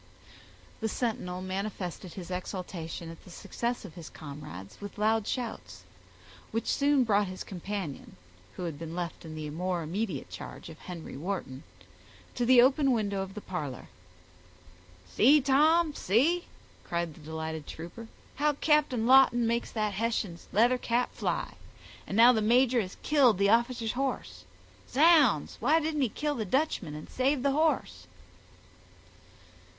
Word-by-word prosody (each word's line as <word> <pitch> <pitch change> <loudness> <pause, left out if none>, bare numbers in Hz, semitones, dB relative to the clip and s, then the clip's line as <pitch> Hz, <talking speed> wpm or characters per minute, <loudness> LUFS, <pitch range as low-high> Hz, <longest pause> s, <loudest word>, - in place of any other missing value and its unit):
The 220 - -1
sentinel 185 -7 -3
manifested 185 -2 -4
his 185 -1 -8
exultation 175 -3 -5
at 165 - -13
the - - -15
success 235 +6 -4
of 175 - -10
his 165 -1 -9
comrades 140 - -10
with 205 0 -8
loud 215 0 +1
shouts, 245 -3 -5 0.7
which 225 +1 -2
soon 285 -1 +3
brought 205 -3 +2
his 185 0 -6
companion, 190 -5 -6 0.4
who - - -6
had 160 -4 -4
been 165 0 -6
left 175 -1 -5
in 155 -1 -8
the 155 -1 -5
more 175 +2 -2
immediate 175 -2 -3
charge - - -8
of 160 - -12
Henry 175 -3 -8
Wharton, 155 -4 -4 0.7
to 240 - -1
the 250 -1 +8
open 275 +1 +3
window 200 -4 -1
of 195 +1 -6
the 210 - -6
parlor. 150 -10 -5 1.2
"See, 275 - +5
Tom, 300 +4 +4
see," 290 - +2 0.4
cried 170 -2 -2
the - - -16
delighted 160 0 -5
trooper, 175 +8 -8 0.3
"how 295 +1 +2
Captain 290 -6 +2
Lawton 255 -2 +6
makes 235 +1 0
that 215 -2 -1
Hessian's 210 -4 -2
leather 240 +4 +4
cap 245 +1 0
fly; - - -2 0.5
and 195 - -3
now 240 +2 +8
the 220 - +1
major 245 +2 +4
has 185 -2 -7
killed 265 -9 +4
the 200 +1 +3
officer's 235 -1 +2
horse—zounds, 230 - +1
why 300 +8 +3
didn't 310 -2 -1
he 255 - +2
kill 295 +7 -2
the 235 -6 -2
Dutchman 260 - -1
and 150 - -8
save 260 +1 0
the 280 - +3
horse?" 310 +2 0
210 Hz, 145 wpm, -29 LUFS, 170-255 Hz, 1.2 s, the